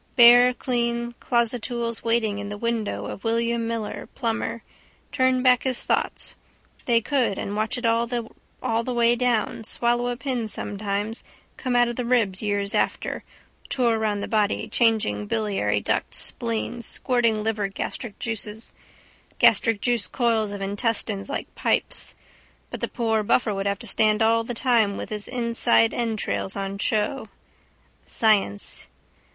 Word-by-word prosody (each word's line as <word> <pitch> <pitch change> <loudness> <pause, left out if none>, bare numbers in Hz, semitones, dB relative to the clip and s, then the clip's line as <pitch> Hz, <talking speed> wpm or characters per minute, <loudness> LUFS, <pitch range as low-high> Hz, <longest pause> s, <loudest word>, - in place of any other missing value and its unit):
Bare 245 0 +8
clean 235 -2 -1
closestools 235 -1 -1
waiting 225 -3 +1
in 205 0 -5
the 205 - -5
window 230 -1 -2
of 195 - -7
William 230 0 0
Miller, 230 -2 -4
plumber, 230 -1 -2 0.5
turned 260 -2 +2
back 250 -2 +5
his 260 -2 -2
thoughts. - - -1 0.5
They 235 -2 +3
could: 250 -5 0
and 200 - -4
watch 220 +4 -1
it 245 - -4
all 230 +1 +2
the 235 0 -4
way 235 0 +4
down, 240 -2 0
swallow 240 +2 +2
a 245 0 -2
pin 255 -4 -2
sometimes 205 +1 -3 0.3
come 255 -2 -2
out 240 0 +5
of 240 - -4
the 250 - -1
ribs 225 -6 +2
years 205 -1 0
after, - - -1 0.5
tour 235 -4 +1
round 210 -2 -1
the - - -3
body 215 0 0
changing 215 - +1
biliary 105 -1 0
duct - - -1
spleen 110 - -2
squirting 230 -2 +1
liver 215 -2 0
gastric 205 +3 -6
juice 220 -1 -5 1.4
coils 230 -4 +1
of 200 -1 -6
intestines 205 +1 0
like - - -5
pipes. - - 0 0.6
But - - -6
the - - 0
poor 225 -2 0
buffer 215 +1 +2
would 195 0 -2
have 200 0 0
to 235 - -10
stand 215 0 +3
all 230 +1 +3
the 240 +1 -5
time 225 -5 +2
with - - -6
his 210 -1 -4
insides 235 - +2
entrails 220 -4 -2
on 195 0 -4
show. 215 +6 -1 0.7
Science. 200 - +1
225 Hz, 145 wpm, -24 LUFS, 205-240 Hz, 1.4 s, Bare